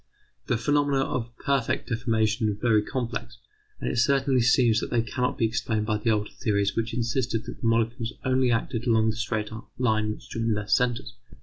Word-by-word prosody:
The 120 - +1
phenomena 145 +2 +2
of 120 -3 -3
permanent 140 -4 0
deformation 115 -2 0
are 105 - -1
very 110 0 +3
complex, 120 0 -4 0.4
and - - -4
it - - -1
certainly 135 -1 +3
seems 120 -1 +4
that - - -4
they 115 -2 +1
cannot 125 +2 -2
be 115 - +2
explained 110 -1 -1
by 105 -1 0
the 115 - 0
older 105 -1 0
theories 100 -2 0
which 115 +1 -1
insisted 120 -1 -1
that 120 - -8
the 115 - 0
molecules 115 +1 0
only 130 -1 +2
acted 115 +1 -1
along 110 -1 +3
the - - -7
straight 110 -2 -2 0.3
line 110 -4 +1
which - - -13
joined 115 -2 -1
their 105 - -3
centres. 125 +1 +1
115 Hz, 190 wpm, -26 LUFS, 110-125 Hz, 0.4 s, seems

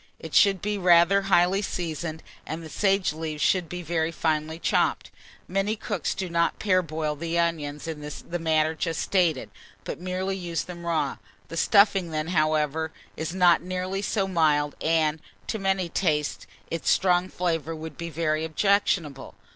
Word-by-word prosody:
It - - -9
should 195 -2 +4
be 210 0 -1
rather 180 +2 +5
highly 185 +2 +4
seasoned, 165 -4 -4 0.2
and 165 +1 -6
the 160 - -9
sage 195 -5 +1
leaves 155 -1 -4
should 180 -4 +2
be 180 0 -5
very 165 0 0
finely 155 0 -1
chopped. - - 0 0.4
Many 195 +3 0
cooks 200 -6 -3
do 190 - -3
not 170 -1 +1
parboil 160 -6 0
the 165 +3 -3
onions 155 -3 -1
in 160 -2 -5
the 150 +4 -6
manner 160 -1 +2
just 165 0 -2
stated, 170 -8 +1 0.3
but - - -5
merely 185 +1 -2
use 170 -5 -3
them 170 -1 -8
raw. 165 -2 0 0.3
The 165 - -6
stuffing 200 -2 +4
then, 155 0 -3
however, 155 -1 +1 0.2
is 160 +3 -4
not 180 -2 +5
nearly 185 +2 -3
so 200 -1 0
mild, 150 -5 +2
and, 160 -1 +1 0.2
to 220 - -3
many 190 -2 0
tastes, 155 -4 -1 0.2
its 165 - -1
strong 180 0 +3
flavour 165 -3 -2
would 160 -1 -8
be 170 +3 -5
very 155 -1 -1
objectionable. 160 -4 0
170 Hz, 160 wpm, -26 LUFS, 155-185 Hz, 0.4 s, rather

